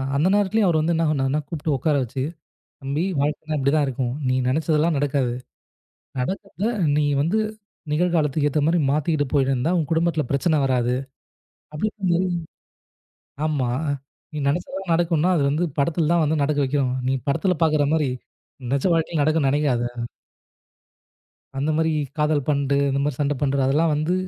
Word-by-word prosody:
அந்த 150 Hz, +5 st, +2 dB
நேரத்திலேயே 205 Hz, +1 st, +2 dB
அவர் 170 Hz, -3 st, +3 dB
வந்து 160 Hz, +2 st, +1 dB
என்ன 165 Hz, -, +1 dB
பண்ணுவாருன்னா 140 Hz, -1 st, +1 dB
கூப்பிட்டு 155 Hz, -2 st, -2 dB
உட்கார 150 Hz, +4 st, +1 dB
வச்சு, 125 Hz, +2 st, -5 dB, 0.6 s
"தம்பி 140 Hz, +4 st, -2 dB, 0.2 s
வாழ்க்கைன்னா 150 Hz, +2 st, -1 dB
இப்படி 140 Hz, 0 st, +1 dB
தான் 150 Hz, -2 st, +3 dB
இருக்கும். 125 Hz, -1 st, -2 dB
நீ 130 Hz, -, +2 dB
நினைச்சதெல்லாம் 155 Hz, +3 st, +1 dB
நடக்காது. 135 Hz, -3 st, 0 dB, 0.9 s
நடக்கிறதை 195 Hz, -, -3 dB, 0.3 s
நீ 150 Hz, -, +2 dB, 0.2 s
வந்து 170 Hz, +9 st, +1 dB, 0.5 s
நிகழ்காலத்துக்கு 155 Hz, -3 st, +1 dB
ஏத்த 150 Hz, -, +1 dB
மாரி 170 Hz, +2 st, +3 dB
மாத்திக்கிட்டு 150 Hz, 0 st, +1 dB
போயிடுந்தா 135 Hz, +2 st, +1 dB
உன் 155 Hz, -4 st, -1 dB
குடும்பத்துல 165 Hz, -2 st, +1 dB
பிரச்சனை 155 Hz, +3 st, +2 dB
வராது" 125 Hz, -2 st, +1 dB, 0.8 s
அப்படின்ற 210 Hz, +7 st, -3 dB
மாரி 185 Hz, +2 st, +2 dB, 1.2 s
ஆமா. 140 Hz, -5 st, 0 dB, 0.6 s
"நீ 150 Hz, -, -5 dB
நினைச்சதுதான் 180 Hz, +3 st, -3 dB
நடக்கும்னா 170 Hz, 0 st, +2 dB
அது 145 Hz, -, +1 dB
வந்து 155 Hz, +5 st, +1 dB
படத்துல 155 Hz, +2 st, +1 dB
தான் 170 Hz, -2 st, +3 dB
வந்து 150 Hz, 0 st, 0 dB
நடக்க 145 Hz, +1 st, 0 dB
வைக்கணும். 130 Hz, -2 st, 0 dB
நீ 135 Hz, -, +2 dB
படத்துல 180 Hz, +6 st, +1 dB
பாக்குற 155 Hz, -2 st, +3 dB
மாதிரி 155 Hz, -4 st, +1 dB, 0.6 s
நிஜ 140 Hz, -, 0 dB
வாழ்க்கல 160 Hz, -1 st, 0 dB
நடக்கும்னு 155 Hz, -2 st, +2 dB
நினைக்காத." 140 Hz, -4 st, +1 dB, 1.8 s
அந்த 145 Hz, +3 st, 0 dB
மாதிரி 160 Hz, 0 st, +1 dB, 0.3 s
காதல் 150 Hz, -2 st, +1 dB
பண்ட்டு, 140 Hz, -1 st, +1 dB
இந்த 135 Hz, +1 st, 0 dB
மாதிரி 145 Hz, -3 st, -2 dB
சண்டை 145 Hz, 0 st, +1 dB
பண்ணுற 140 Hz, -1 st, +1 dB
அதெல்லாம் 155 Hz, +4 st, +2 dB
வந்து 155 Hz, +4 st, 0 dB
150 Hz, 150 wpm, -23 LUFS, 140-165 Hz, 1.8 s, அவர்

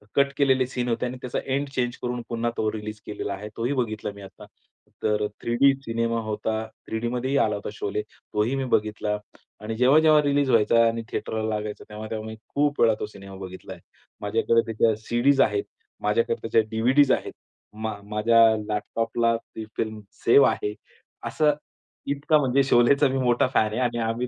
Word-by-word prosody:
Cut 140 Hz, 0 st, +3 dB
केलेले 130 Hz, -2 st, +3 dB
scene 125 Hz, -1 st, -3 dB
होते 115 Hz, +2 st, 0 dB
आणि 125 Hz, +1 st, -4 dB
त्याचा 125 Hz, -, -3 dB
एंड 140 Hz, +1 st, -1 dB
चेंज 125 Hz, -2 st, -2 dB
करून 125 Hz, 0 st, -3 dB
पुन्हा 115 Hz, 0 st, -1 dB
तो 110 Hz, -1 st, 0 dB
रिलीज 110 Hz, 0 st, -6 dB
केलेला 105 Hz, -1 st, -4 dB
आहे 105 Hz, +2 st, -7 dB
तोही 120 Hz, +4 st, 0 dB
बघितला 110 Hz, -5 st, -2 dB
मी 100 Hz, -, -11 dB
आता. 95 Hz, 0 st, -12 dB, 0.6 s
तर 105 Hz, 0 st, +1 dB, 0.2 s
3 120 Hz, 0 st, -1 dB
डी 140 Hz, +2 st, +5 dB
सिनेमा 115 Hz, 0 st, -1 dB
होता 110 Hz, 0 st, -2 dB, 0.3 s
3 110 Hz, -, -2 dB
डीमध्येही 125 Hz, +4 st, -1 dB
आला 105 Hz, -6 st, +2 dB
होता 100 Hz, -, -5 dB
शोले, 105 Hz, 0 st, -3 dB, 0.3 s
तोही 110 Hz, +6 st, +1 dB
मी 135 Hz, -1 st, -1 dB
बघितला 105 Hz, 0 st, 0 dB, 0.4 s
आणि 110 Hz, +1 st, -4 dB
जेव्हा-जेव्हा 150 Hz, +4 st, +5 dB
रिलीज 145 Hz, -1 st, +2 dB
व्हायचा 115 Hz, 0 st, +4 dB
आणि 115 Hz, 0 st, -1 dB
थेटरला 110 Hz, 0 st, -3 dB
लागायचा 105 Hz, 0 st, -5 dB
तेव्हा-तेव्हा 110 Hz, +1 st, -6 dB
मी 110 Hz, -, -7 dB, 0.2 s
खूप 145 Hz, 0 st, +1 dB
वेळा 115 Hz, -1 st, +5 dB
तो -, -, -2 dB
सिनेमा 100 Hz, -2 st, -12 dB
बघितला 95 Hz, 0 st, -8 dB
आहे. 85 Hz, -, -15 dB, 0.4 s
माझ्याकडे 115 Hz, +2 st, +1 dB
त्या 110 Hz, 0 st, +3 dB
सी-डीज 120 Hz, +5 st, +2 dB
आहेत 400 Hz, -, +2 dB, 0.4 s
माझ्याकडे 465 Hz, 0 st, 0 dB
त्या 115 Hz, -, +6 dB
डी-व्ही-डीज 130 Hz, +5 st, +4 dB
आहेत. -, -, 0 dB, 0.4 s
मा 110 Hz, 0 st, -4 dB
माझ्या 105 Hz, +3 st, +3 dB, 0.3 s
लॅपटॉपला 115 Hz, +2 st, 0 dB
ती 110 Hz, -1 st, -10 dB
फिल्म 110 Hz, -1 st, -2 dB, 0.3 s
सेव्ह 140 Hz, +4 st, +7 dB
आहे, 105 Hz, -, -2 dB, 0.5 s
असं 150 Hz, -1 st, +2 dB, 0.6 s
इतका 145 Hz, +2 st, +2 dB
म्हणजे 135 Hz, 0 st, +2 dB
शोलेचा 135 Hz, +3 st, +4 dB
मी 135 Hz, -, -1 dB
मोठा 125 Hz, -1 st, +2 dB
फॅन 110 Hz, -3 st, +2 dB
आहे 110 Hz, -, -2 dB
आणि 120 Hz, -1 st, 0 dB
आम्ही 120 Hz, +2 st, -2 dB
115 Hz, 175 wpm, -25 LUFS, 110-130 Hz, 0.6 s, सेव्ह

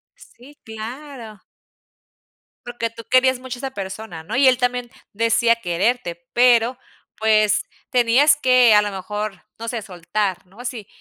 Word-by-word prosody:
Sí, 280 Hz, +5 st, -18 dB
claro. 225 Hz, 0 st, -9 dB, 1.3 s
Porque 240 Hz, -1 st, -4 dB
tú 230 Hz, 0 st, -11 dB
querías 260 Hz, 0 st, +4 dB
mucho 255 Hz, -1 st, -7 dB
a -, -, -11 dB
esa 270 Hz, -1 st, -4 dB
persona, 190 Hz, -3 st, -7 dB
¿no?, 220 Hz, +9 st, -4 dB
y 265 Hz, +1 st, +6 dB
él 255 Hz, -1 st, +3 dB
también 245 Hz, -1 st, -1 dB, 0.2 s
decía 230 Hz, +2 st, +2 dB
quererte, 175 Hz, -3 st, -2 dB
pero, 245 Hz, 0 st, +4 dB, 0.4 s
pues, 215 Hz, -1 st, +2 dB, 0.3 s
tenías 250 Hz, +4 st, +4 dB
que, 255 Hz, -5 st, +5 dB
a 210 Hz, -, +6 dB
lo 205 Hz, -, -2 dB
mejor, 200 Hz, +1 st, -5 dB
no 230 Hz, +1 st, -6 dB
sé, 230 Hz, -2 st, -3 dB
soltar, 190 Hz, 0 st, -3 dB
¿no?, 205 Hz, +7 st, -14 dB
si 240 Hz, -5 st, -5 dB
230 Hz, 145 wpm, -21 LUFS, 210-250 Hz, 1.3 s, y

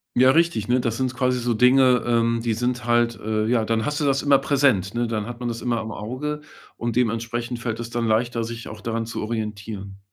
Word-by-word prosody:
Ja, 130 Hz, +1 st, +6 dB
richtig, 165 Hz, -10 st, +2 dB
ne? 125 Hz, +1 st, +3 dB
Das 115 Hz, -1 st, -1 dB
sind 130 Hz, -1 st, -1 dB
quasi 125 Hz, -1 st, +1 dB
so 120 Hz, 0 st, 0 dB
Dinge, 125 Hz, +1 st, +5 dB
ähm, 115 Hz, -1 st, +2 dB
die 115 Hz, -2 st, +1 dB
sind 120 Hz, +1 st, -1 dB
halt, 120 Hz, -1 st, +2 dB
äh 110 Hz, 0 st, -1 dB
ja, 115 Hz, -1 st, +2 dB
dann 110 Hz, 0 st, 0 dB
hast 150 Hz, 0 st, -1 dB
du 150 Hz, -, 0 dB
das 135 Hz, -1 st, +1 dB
immer 140 Hz, -2 st, +5 dB
präsent, 135 Hz, -8 st, +2 dB
ne? 120 Hz, 0 st, +1 dB
Dann 110 Hz, -1 st, -2 dB
hat 120 Hz, 0 st, -7 dB
man 120 Hz, -, -3 dB
das 115 Hz, 0 st, -5 dB
immer 120 Hz, -2 st, 0 dB
im 110 Hz, 0 st, -6 dB
Auge 145 Hz, +8 st, -4 dB, 0.4 s
und 120 Hz, -1 st, -3 dB
dementsprechend 120 Hz, 0 st, -1 dB
fällt 115 Hz, -1 st, -3 dB
es 115 Hz, 0 st, -6 dB
dann 115 Hz, -1 st, -1 dB
leichter, 115 Hz, +1 st, +1 dB
sich 115 Hz, +1 st, -6 dB
auch 110 Hz, -1 st, -10 dB
daran 115 Hz, 0 st, -2 dB
zu 115 Hz, -, -5 dB
orientieren. 105 Hz, -3 st, -5 dB
120 Hz, 230 wpm, -23 LUFS, 110-125 Hz, 0.4 s, Ja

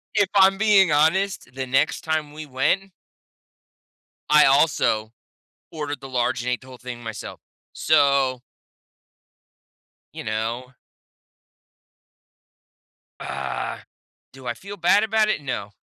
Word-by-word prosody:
if 205 Hz, -3 st, +3 dB
I'm 195 Hz, 0 st, +5 dB
being 200 Hz, -4 st, +4 dB
honest, 160 Hz, +4 st, +1 dB
the 130 Hz, 0 st, -4 dB
next 135 Hz, +4 st, +1 dB
time 155 Hz, -2 st, -2 dB
we 155 Hz, 0 st, -8 dB
went 150 Hz, +9 st, 0 dB, 1.4 s
I 150 Hz, 0 st, +7 dB
also 135 Hz, -6 st, +2 dB, 0.6 s
ordered 145 Hz, -3 st, -5 dB
the 135 Hz, -, -9 dB
large 125 Hz, -1 st, 0 dB
and 125 Hz, -, -2 dB
ate 125 Hz, -, -2 dB
the 130 Hz, -, -16 dB
whole 130 Hz, -1 st, -12 dB
thing 120 Hz, -1 st, -8 dB
myself. 110 Hz, -2 st, -7 dB, 0.3 s
So 140 Hz, -4 st, +2 dB, 1.7 s
you -, -, -7 dB
know? 110 Hz, +3 st, -3 dB, 2.5 s
Ah. -, -, -5 dB, 0.5 s
Do 135 Hz, -1 st, -14 dB
I 120 Hz, -, -2 dB
feel 200 Hz, +9 st, -10 dB
bad 180 Hz, +4 st, +3 dB
about 220 Hz, 0 st, +2 dB
it? 215 Hz, -, 0 dB
No. 115 Hz, -7 st, -5 dB
145 Hz, 115 wpm, -23 LUFS, 125-185 Hz, 2.5 s, I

